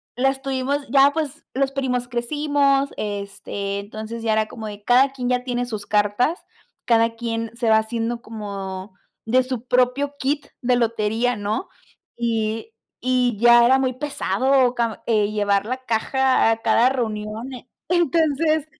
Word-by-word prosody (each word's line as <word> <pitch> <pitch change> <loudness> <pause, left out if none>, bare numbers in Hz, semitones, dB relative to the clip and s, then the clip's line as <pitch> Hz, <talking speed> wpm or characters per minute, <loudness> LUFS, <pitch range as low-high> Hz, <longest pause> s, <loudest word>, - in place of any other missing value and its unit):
las 270 +2 +1
tuvimos 275 +1 -2
Ya 275 +2 +6
pues 310 0 -4
los 270 +1 0
primos 255 -3 -1
crecimos, 280 +2 +1
este, 200 -1 -4
entonces 220 +3 -7
ya 225 -1 +1
era 215 0 +1
como 220 -2 -8
de 205 -1 -9
cada 255 +4 +4
quien 250 -2 -3
ya 250 0 +1
tiene 245 -1 -2
sus 215 -4 -5
cartas, 210 - +1 0.4
cada 230 -1 +3
quien 230 -1 -3
se 235 -1 0
va 220 - +6
haciendo 230 +1 -3
como 200 -3 -7 0.3
de 255 +3 +3
su 255 -2 -5
propio 255 +3 +1
kit 285 +2 -1
de 250 -1 +2
lotería, 230 +1 0
¿no? 210 - -3 0.5
Y 225 - -2 0.3
y 250 -3 +1
ya 240 +1 +7
era 260 +2 +5
muy 260 -1 0
pesado, 265 -2 +1
cam 230 -2 -1
eh, 215 -3 +2
llevar 205 -1 +1
la 255 +2 -2
caja 260 +2 +2
a 225 - +1
cada 240 +2 +4
reunión. 225 0 -3
Eh, 250 0 -10 0.2
entonces, 315 -2 +2
245 Hz, 155 wpm, -22 LUFS, 220-265 Hz, 0.5 s, ya